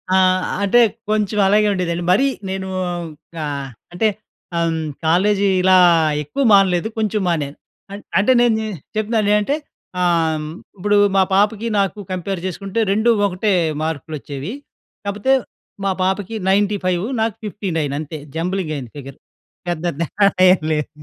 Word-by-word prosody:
ఆహ్, 185 -1 +3 0.2
అంటే 200 +5 +4 0.3
కొంచెం 210 -1 0
అలాగే 210 +2 +4
ఉండేదండి. 175 -2 -2
మరీ 260 +9 +4 0.2
నేనూ 190 0 -4 0.8
ఆహ్, 140 -2 -4 0.2
అంటే 200 +5 +2 0.5
హ్మ్, 165 -1 0 0.3
కాలేజీ 195 +5 +3 0.2
ఇలా 185 0 +5 0.5
ఎక్కువ 150 - -2
మానలేదు. 190 -1 +4
కొంచెం 215 -1 0
మానాను. 150 -4 -1 0.3
అం 200 - -6 0.2
అంటే 205 +7 +4
నేను 235 -2 +3 0.4
చెప్తున్నా 215 +1 0
నే 205 - +4
అంటే 275 +8 0 0.5
ఆహ్, 175 -1 +3 0.2
హ్మ్, 155 0 -4 0.3
ఇప్పుడు 205 +2 +2 0.2
మా 190 - +5
పాపకి 210 +3 +2
నాకు 200 +1 -1
కంపేర్ 185 +1 -3
చేసుకుంటే 195 +4 -3
2 220 +4 +2 0.2
ఒకటే 200 +2 0 0.3
మార్కులు 160 0 -4
వచ్చేవి. 140 - -6 0.5
కాకపోతే 205 +6 +1 0.5
మా 195 - +2
పాపకి 190 +3 -1
95 195 -3 +1 0.2
నాకు 220 -2 0
59 175 -9 -2
అంతే 155 +1 -6 0.2
జంబ్లింగ్ 175 -1 -2
అయింది 125 -5 -7
ఫిగర్ 135 -1 -9 0.5
పెద్ద 175 -1 -2
తేడా 200 +4 +2 0.2
ఏం 185 - +5
లేదు. 150 -1 -2
190 Hz, 135 wpm, -19 LUFS, 170-205 Hz, 0.8 s, ఇలా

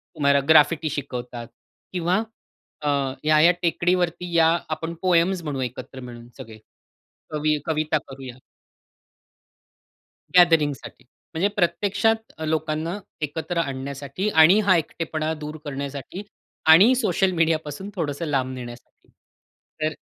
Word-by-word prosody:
तुम्हाला 140 -1 +3
ग्राफिटी 160 +1 +5
शिकवतात 125 -4 -6 0.5
किंवा 180 +1 +1 0.6
अ, 150 - -1 0.3
या-या 155 +2 +5
टेकडी 175 +1 +1
वरती 175 0 -2
या 165 -1 +5 0.2
आपण 165 +1 -4
पोएम्स 180 0 +2
म्हणू 145 -4 -3
एकत्र 130 +1 -6
मिळून 120 -2 -10
सगळे 110 -1 -10 0.7
कवि 150 0 0
कविता 155 0 0
करूया 130 -2 -10 2.0
गॅदरिंग 165 -5 +5
साठी. - - -13 0.3
म्हणजे 175 +5 +1
प्रत्यक्षात 205 +5 0
लोकांना 160 +3 -2 0.2
एकत्र 160 +4 -3
आणण्यासाठी 140 +5 -3
आणि 175 +3 +6
हा 185 - +6
एकटेपणा 160 -1 -3
दूर 150 +1 -6
करण्यासाठी 140 +6 -6 0.5
आणि 205 +10 +7
सोशल 190 -5 +1
मीडियापासून 165 +1 -1
थोडंसं 155 -2 -3
लांब 135 -4 -1
नेण्यासाठी. 120 -1 -11 0.7
तर 155 0 0
155 Hz, 110 wpm, -23 LUFS, 140-175 Hz, 2.0 s, आणि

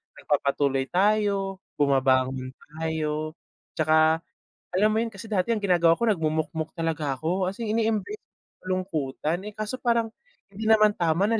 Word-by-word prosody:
nagpapatuloy 140 -1 0
tayo, 195 +1 +1 0.2
bumabangon 130 -2 +1
tayo. 155 0 -4 0.4
Tsaka 155 +1 +3 0.5
alam 205 +4 +3
mo 220 - +2
'yon, 230 - -2
kasi 200 -1 -11
dati 205 -2 -1
ang 230 -2 +2
ginagawa 170 -3 +4
ko, 235 - 0
nagmumukmok 160 -5 0
talaga 160 -4 -1
ko, 180 +6 0
as 195 - -9
in 225 -2 -2
ine-embrace 225 - -1
ko - - -55
yung - - -
kalungkutan. 170 -4 -2
Eh, - - -14
kaso 215 +4 -4
parang 235 -2 +1 0.4
hindi 215 +3 -3
naman 215 -1 +6
tama 170 +1 +1
na 225 +1 +1
175 Hz, 155 wpm, -26 LUFS, 155-210 Hz, 0.5 s, naman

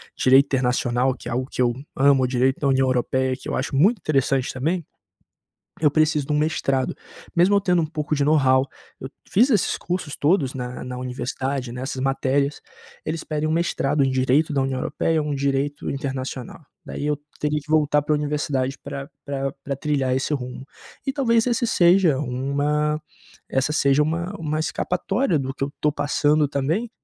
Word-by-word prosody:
direito 135 +2 +5
internacional 125 -1 +1
que - - -10
é - - -4
algo 130 +2 -1
que - - -9
eu 120 -1 +3 0.2
amo 135 -1 +4
o - - +2
direito 130 +1 +1
da 140 - 0
União 135 -1 +3
Europeia, 130 +1 +1
que - - -8
eu - - -1
acho 135 +2 -2
muito 200 - +4
interessante 135 -6 0
também. 160 +6 -1 1.0
Eu 150 - +4
preciso 155 -1 +2
de 150 - -2
um 150 - +2
mestrado, 135 -4 0 0.4
mesmo 180 +4 +4
eu - - +4
tendo 180 -3 +2
um - - -1
pouco 150 0 -2
de 145 -1 +1
know-how. 135 -3 +3 0.3
Eu 130 - -6 0.2
fiz 245 +7 +4
esses 215 - +2
cursos 175 -5 -4
todos 145 -4 +1
na 125 -1 -5
na 125 0 -6
universidade, 130 0 -3
nessas 130 +1 -4
matérias, 135 +1 0 0.4
eles 160 +1 -3
pedem 155 0 -2
um 155 - 0
mestrado 150 -4 +1
em 135 - +1
direito 130 +4 +2
da 140 - +1
União 135 -1 -1
Europeia, 155 +4 0
um 150 -1 -2
direito 140 +1 -1
internacional. 135 -1 -5 0.2
Daí, - - -5
eu 150 -1 0 0.2
teria 150 0 0
que 150 +1 -14
voltar 150 -1 +3
pra 150 +1 +1
universidade 145 -2 -1
pra 140 0 -6 0.2
pra 135 -1 -3
pra 140 0 -3
trilhar 135 -3 0
esse 135 - -2
rumo. 125 -1 -6 0.4
E 270 - 0
talvez 235 -5 +2
esse 240 0 +1
seja 175 -6 +4
uma 145 +3 -1 0.5
essa 135 +3 0
seja 140 -1 +3
uma 170 +5 -2
uma 155 -1 -2
escapatória 180 - 0
do 135 0 -3
que 135 - -7
eu 140 +1 -1
tô 150 - +2
passando 145 +1 +2
também. 160 - -1
140 Hz, 180 wpm, -23 LUFS, 130-155 Hz, 1.0 s, direito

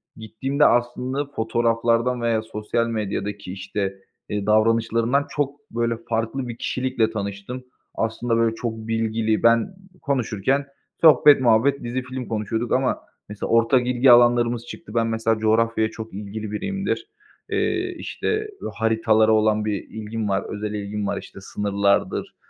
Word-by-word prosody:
Gittiğimde 130 +7 0
aslında 125 +3 +1
fotoğraflardan 115 -1 0
veya 115 -2 +1
sosyal 110 +1 -2
medyadaki 100 -3 -3
işte, 95 0 -3 0.4
iii, 105 -1 -2
davranışlarından 115 +4 +2
çok, 145 0 -2
böyle, 115 0 -1
farklı 115 +3 -1
bir 120 0 -6
kişilikle 125 -4 -1
tanıştım. 100 +4 -5 0.3
Aslında 115 +1 -1
böyle 115 -1 +2
çok 115 -1 -3
bilgili, 110 -1 0
ben 115 +11 +3 0.3
konuşurken 135 0 0 0.4
sohbet, 150 -3 +7
muhabbet, 125 +4 +3
dizi, 120 +2 -2
film 130 0 -6
konuşuyorduk 110 +1 -2
ama 130 0 +1 0.3
mesela 105 - -5
ortak 120 +2 +3
ilgi 125 +1 +5
alanlarımız 120 -1 +4
çıktı. 105 - -10
Ben 115 -1 +2
mesela 115 0 0
coğrafyaya 110 0 +2
çok 110 -2 -8
ilgili 105 +1 -6
biriyimdir. 195 - -3 0.4
Eee, 370 -1 0
işte, 430 0 -3 0.2
haritalara 110 -1 +3
olan 110 -1 +3
bir 105 -2 -2
ilgim 110 -1 -4
var, 95 0 0
özel 105 0 -4
ilgim 105 0 -3
var. - - -2
İşte 100 - -10
sınırlardır, 100 0 0
115 Hz, 135 wpm, -23 LUFS, 110-125 Hz, 0.4 s, sohbet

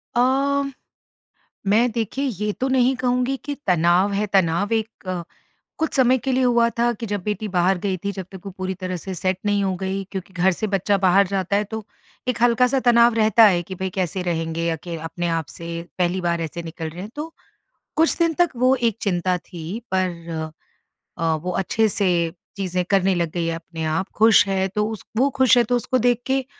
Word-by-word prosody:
अ, 275 +3 +2 1.0
मैं 225 +5 +3
देखिए 235 +5 -2
ये 210 -4 -2
तो 265 - +1
नहीं 260 0 +3
कहूँगी 250 +1 0
कि 290 -2 -3
तनाव 180 +3 +3
है, 205 +2 0
तनाव 195 +1 +1
एक 220 -3 -3
अ, 180 -2 -2 0.6
कुछ 320 -1 -1
समय 260 -1 +4
के 265 +2 -2
लिए 255 0 +2
हुआ 235 -1 +4
था 240 0 +3
कि 230 +1 -6
जब 205 -3 -3
बेटी 210 0 -2
बाहर 185 0 +2
गई 190 0 -2
थी, 200 +3 -3
जब 190 -2 -6
तक 190 - -10
वो 195 - -5
पूरी 185 0 -2
तरह 185 0 -4
से 190 +3 -6
सेट 185 +2 -1
नहीं 205 -1 +2
हो 190 -1 0
गई। 190 +1 -3
क्योंकि 190 -1 -6
घर 180 +1 +3
से 215 +4 -3
बच्चा 200 +1 +1
बाहर 195 0 +4
जाता 195 0 -1
है 205 - +2
तो, 220 +1 -6 0.4
एक 250 -3 -1
हल्का-सा 250 +2 +4
तनाव 240 -1 +5
रहता 220 0 +5
है 180 -4 +4
कि 185 +2 -8
भाई 190 +1 -3
कैसे 185 0 -2
रहेंगे 165 -1 -1
अके 165 +1 -4
अ, 160 - -9
अपने 175 +2 -3
आप 165 -1 -1
से, 170 +3 -6 0.2
पहली 180 +1 0
बार 170 -1 0
ऐसे 165 +1 -5
निकल 165 -1 -6
रहे 170 +3 -8
हैं। 205 - -7
तो, 315 +2 -6 0.6
कुछ 325 +1 +2
दिन 335 -1 +3
तक 345 +1 +3
वो 255 +2 +3
एक 235 -4 0
चिंता 180 -2 0
थी 175 +4 -7
पर 170 -4 -2 0.7
अ, 165 -1 +2
वो 165 +4 -3
अच्छे 195 +4 +1
से 180 -5 +1 0.2
चीज़ें 185 -2 -1
करने 195 -1 +3
लग 170 -2 -1
गई 170 -1 -1
है 165 - -1
अपने 165 0 -6
आप, 160 +5 0
ख़ुश 220 -1 +6
है 190 -1 0
तो 210 +2 -1
उस 220 -3 -7
वो 260 +5 +4
ख़ुश 260 -2 +5
है 240 - +6
तो 245 +2 +1
उसको 255 +2 0
देख 245 0 +2
के 265 0 +1
195 Hz, 210 wpm, -22 LUFS, 175-235 Hz, 1.0 s, ख़ुश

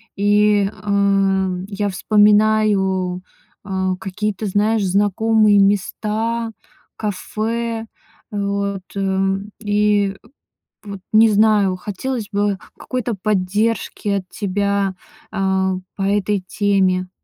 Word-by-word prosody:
И, 205 0 +3
эм, 195 -2 +1
я 205 0 -2
вспоминаю, 205 -3 +2 0.4
а, 190 -1 -1
какие-то, 205 +2 -3
знаешь, 210 +2 +1
знакомые 205 +2 +3
места, 215 +3 0 0.4
кафе. 225 +2 -3 0.5
Э, 205 - -4
вот, 200 -1 -2
м. 195 +1 -1
И 205 -2 +1 0.7
вот 200 -2 -7
не 220 +1 +6
знаю, 210 -2 +3
хотелось 210 +4 -4
бы 205 -1 0 0.2
какой-то 250 -2 -3
поддержки 205 +2 -1
от 195 -2 -1
тебя, 200 -1 -1 0.4
э, - - -4 0.6
по - - -6
этой 205 +1 +1
теме. 185 -2 +1
205 Hz, 95 wpm, -19 LUFS, 195-215 Hz, 0.7 s, не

